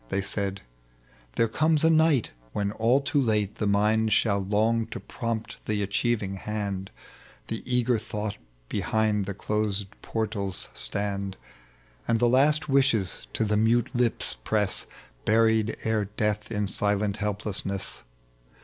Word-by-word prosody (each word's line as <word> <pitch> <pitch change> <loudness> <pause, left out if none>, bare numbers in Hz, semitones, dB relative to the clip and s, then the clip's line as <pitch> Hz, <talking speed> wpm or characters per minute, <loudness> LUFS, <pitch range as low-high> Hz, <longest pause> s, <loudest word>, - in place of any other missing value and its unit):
They 100 - 0
said, 100 0 -2 0.4
" - - -31
There 115 - +3
eomea 155 +6 +2
a 160 - +6
night 160 -6 +3 0.2
when 100 0 -1
all 115 +6 +2
too 140 +1 +1
late 105 -4 0
The 105 - 0
mind 110 +2 +2
shall 100 -2 +3
long 110 +3 +1
to - - -6
prompt 115 -2 -5
the 105 -1 0
achieving 100 -1 -1
hand, 100 -2 -3 0.6
The 115 - -3
e^er 125 -2 +1
thought 105 -2 -4 0.3
behind 105 - 0
closed 105 -1 -1 0.2
portals 105 -4 -2
stand. 100 +10 -1 0.7
And 115 - +3
the 120 - +4
last 145 +6 +3
wishes 135 - +1
to 110 - +1
the 105 - 0
mnte 115 +2 +2
lips 120 - +1
press 105 - 0 0.4
Buried 110 0 +3
ere 110 -2 +1
death 105 +1 -2
in 105 -2 0
silent 105 +1 0
helplessness. 100 -2 -2
105 Hz, 135 wpm, -27 LUFS, 100-115 Hz, 0.7 s, a